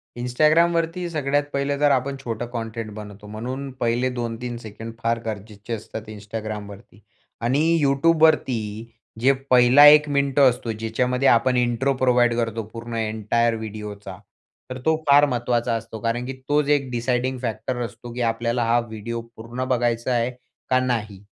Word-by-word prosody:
Instagramवरती 165 Hz, +7 st, +2 dB
सगळ्यात 145 Hz, -2 st, 0 dB
पहिलं 140 Hz, +1 st, -1 dB
जर 145 Hz, 0 st, +3 dB
आपण 135 Hz, +1 st, 0 dB
छोटा 115 Hz, 0 st, -3 dB
कंटेंट 115 Hz, -1 st, -5 dB
बनवतो 105 Hz, -1 st, -10 dB
म्हणून 130 Hz, +6 st, -5 dB
पहिले 120 Hz, +2 st, +1 dB
2-3 120 Hz, +1 st, -4 dB
सेकंड 115 Hz, 0 st, -9 dB
फार 115 Hz, 0 st, +1 dB
गरजेचे 105 Hz, +1 st, -6 dB
असतात 110 Hz, 0 st, -7 dB
Instagramवरती 105 Hz, 0 st, -8 dB, 0.4 s
आणि 135 Hz, +4 st, +2 dB, 0.2 s
YouTubeवरती 140 Hz, -4 st, +3 dB, 0.6 s
जे 135 Hz, +3 st, +5 dB, 0.2 s
पहिला 125 Hz, +3 st, +7 dB
1 150 Hz, 0 st, +7 dB
मिनिट 140 Hz, -1 st, +1 dB
असतो 125 Hz, -3 st, +3 dB
ज्याच्यामध्ये 125 Hz, +4 st, 0 dB
आपण 125 Hz, +1 st, +4 dB
इंट्रो 120 Hz, +3 st, +1 dB
प्रोव्हाईड 125 Hz, -2 st, +3 dB
करतो 115 Hz, -1 st, -1 dB
पूर्ण 115 Hz, 0 st, -7 dB
एंटायर 110 Hz, +1 st, 0 dB
व्हिडिओचा 105 Hz, -3 st, -7 dB, 0.5 s
तर 130 Hz, -, -5 dB
तो 160 Hz, 0 st, +4 dB
फार 145 Hz, +1 st, +7 dB
महत्वाचा 120 Hz, -3 st, 0 dB
असतो. 110 Hz, -1 st, -6 dB
कारण 115 Hz, +2 st, -2 dB
की 135 Hz, -, -4 dB, 0.2 s
तोच 145 Hz, 0 st, +2 dB
एक 140 Hz, -3 st, +2 dB
डिसायडिंग 125 Hz, +2 st, -1 dB
फॅक्टर 115 Hz, +1 st, -3 dB
असतो 120 Hz, +1 st, -10 dB
की 125 Hz, -, -4 dB
आपल्याला 115 Hz, +1 st, -1 dB
हा 115 Hz, +1 st, +3 dB
व्हिडिओ 115 Hz, +2 st, -5 dB
पूर्ण 120 Hz, +3 st, -5 dB
बघायचा 120 Hz, -1 st, 0 dB
आहे 120 Hz, +1 st, +1 dB, 0.4 s
का 130 Hz, -, +4 dB
नाही? 110 Hz, -6 st, -2 dB
120 Hz, 145 wpm, -23 LUFS, 115-130 Hz, 0.6 s, पहिला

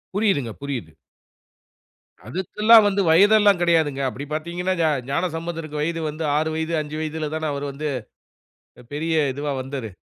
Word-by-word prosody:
புரியுதுங்க. 195 Hz, -, +1 dB
புரியுது. 130 Hz, -, -5 dB, 1.4 s
அதுக்கெல்லாம் 210 Hz, -, +4 dB
வந்து 200 Hz, 0 st, +1 dB
வயதெல்லாம் 205 Hz, +2 st, +5 dB
கிடையாதுங்க. 160 Hz, -5 st, +2 dB
அப்படி 140 Hz, +3 st, -7 dB
பார்த்தீங்கன்னா 175 Hz, +4 st, -2 dB
ஞா 160 Hz, -, +3 dB, 0.2 s
ஞானசம்பந்தருக்கு 165 Hz, -1 st, -3 dB
வயது 165 Hz, +2 st, -1 dB
வந்து 155 Hz, +2 st, -5 dB
6 160 Hz, +1 st, 0 dB
வயது, 160 Hz, +1 st, -2 dB
5 150 Hz, +1 st, -6 dB
வயதுல 155 Hz, -1 st, -3 dB
தான 160 Hz, -1 st, -2 dB
அவரரு 140 Hz, 0 st, -4 dB
வந்து. 150 Hz, +2 st, -4 dB, 0.9 s
அ 125 Hz, -, -15 dB
பெரிய 160 Hz, +2 st, -1 dB, 0.2 s
இதுவா 145 Hz, +2 st, -3 dB
வந்தாரு. 130 Hz, -4 st, -6 dB
160 Hz, 135 wpm, -23 LUFS, 145-175 Hz, 1.4 s, வயதெல்லாம்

